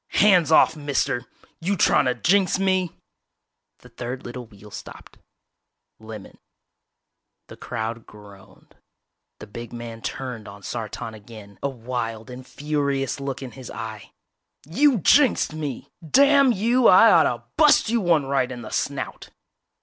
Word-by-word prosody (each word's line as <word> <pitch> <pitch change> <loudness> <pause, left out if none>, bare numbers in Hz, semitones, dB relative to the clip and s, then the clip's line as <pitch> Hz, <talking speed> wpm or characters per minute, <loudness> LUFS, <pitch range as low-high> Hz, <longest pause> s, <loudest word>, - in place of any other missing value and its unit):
"Hands 185 -6 +4
off, 160 - +5
mister! 140 -4 -2 0.3
You 190 +4 -1
trying - - +3
to 125 -1 +1
jinx 185 +10 +2
me?" 185 -2 0 0.9
The - - -16
third 125 +2 -7
little 120 0 -7
wheel 105 -1 -16
stopped. - - -11 0.8
Lemon. 110 -2 -11 1.1
The - - -10
crowd 115 +1 -5
groaned. 100 -2 -17 0.6
The - - -10
big 115 +3 -9
man 115 -1 -8
turned 125 -4 -6
on 100 0 -12
Sartan 110 -1 -6
again, 105 -2 -13
a 140 - -1
wild 115 -2 -5
and 125 +1 -10
furious 140 -2 -2
look 135 -1 -5
in 130 - -7
his 130 -1 -11
eye. 110 -3 -8 0.6
"You 265 - +3
jinxed 255 - +3
me! 150 -5 -6
Damn 275 - +5
you, 235 +3 +2
I 220 +5 +7
oughta' - - +3
bust 300 -7 +5
you 235 -1 +1
one 165 -6 +2
right 135 -2 0
in 120 -2 -7
the 110 - -9
snout!!" 140 -2 -4
130 Hz, 140 wpm, -23 LUFS, 115-175 Hz, 1.1 s, I